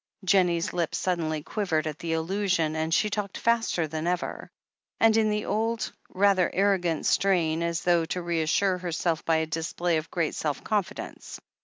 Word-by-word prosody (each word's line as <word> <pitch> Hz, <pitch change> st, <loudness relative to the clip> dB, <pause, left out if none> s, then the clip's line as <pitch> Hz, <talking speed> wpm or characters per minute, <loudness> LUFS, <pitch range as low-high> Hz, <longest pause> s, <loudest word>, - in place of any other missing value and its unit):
Jennie's 180 Hz, -1 st, +2 dB
lip 170 Hz, -3 st, -1 dB
suddenly 160 Hz, -4 st, -1 dB
quivered 165 Hz, -7 st, -1 dB
at 155 Hz, -1 st, -4 dB
the 165 Hz, -1 st, -2 dB
allusion, 165 Hz, -1 st, 0 dB
and 160 Hz, 0 st, -1 dB
she 210 Hz, -, +3 dB
talked 200 Hz, -2 st, -3 dB
faster 230 Hz, -8 st, +1 dB
than 155 Hz, +2 st, -4 dB
ever, 180 Hz, 0 st, -2 dB, 0.5 s
and 225 Hz, -1 st, +5 dB
in 220 Hz, -1 st, +3 dB
the 210 Hz, 0 st, -1 dB
old, 225 Hz, 0 st, -1 dB, 0.2 s
rather 195 Hz, -2 st, +3 dB
arro 195 Hz, 0 st, +3 dB
gant 165 Hz, -3 st, -1 dB
strain, 170 Hz, -5 st, +2 dB
as 170 Hz, 0 st, -1 dB
though 170 Hz, -2 st, +3 dB
to 180 Hz, +2 st, -3 dB
reassure 170 Hz, +3 st, +1 dB
herself 170 Hz, -2 st, -1 dB
by 165 Hz, -, +3 dB
a 160 Hz, 0 st, +1 dB
display 165 Hz, +1 st, -1 dB
of 155 Hz, +1 st, -4 dB
great 170 Hz, -3 st, -1 dB
self 150 Hz, -2 st, -3 dB
confidence. 210 Hz, -4 st, -3 dB
175 Hz, 170 wpm, -27 LUFS, 160-200 Hz, 0.5 s, and